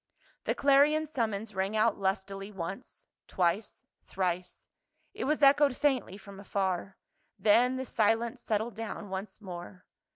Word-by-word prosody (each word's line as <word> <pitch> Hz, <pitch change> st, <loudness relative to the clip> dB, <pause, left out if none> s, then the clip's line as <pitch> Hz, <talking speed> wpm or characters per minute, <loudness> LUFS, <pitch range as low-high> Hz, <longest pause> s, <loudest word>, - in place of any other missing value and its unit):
The -, -, 0 dB
clarion 285 Hz, +3 st, +4 dB
summons 225 Hz, -7 st, -3 dB
rang 195 Hz, +2 st, -1 dB
out 220 Hz, 0 st, +3 dB
lustily 195 Hz, +1 st, -3 dB
once, 190 Hz, +4 st, -7 dB, 0.2 s
twice, 185 Hz, +4 st, -1 dB, 0.2 s
thrice; 180 Hz, -1 st, -3 dB, 0.5 s
it -, -, -4 dB
was 300 Hz, +1 st, 0 dB
echoed 280 Hz, -1 st, +5 dB
faintly 260 Hz, -9 st, 0 dB
from 200 Hz, -1 st, -12 dB
afar, 195 Hz, -1 st, -2 dB, 0.4 s
then 245 Hz, +4 st, +4 dB
the 260 Hz, -, -3 dB
silence 225 Hz, 0 st, +1 dB
settled 220 Hz, +2 st, -1 dB
down 220 Hz, -1 st, -6 dB
once 190 Hz, +1 st, -5 dB
more. 180 Hz, -1 st, -9 dB
210 Hz, 130 wpm, -30 LUFS, 190-245 Hz, 0.5 s, echoed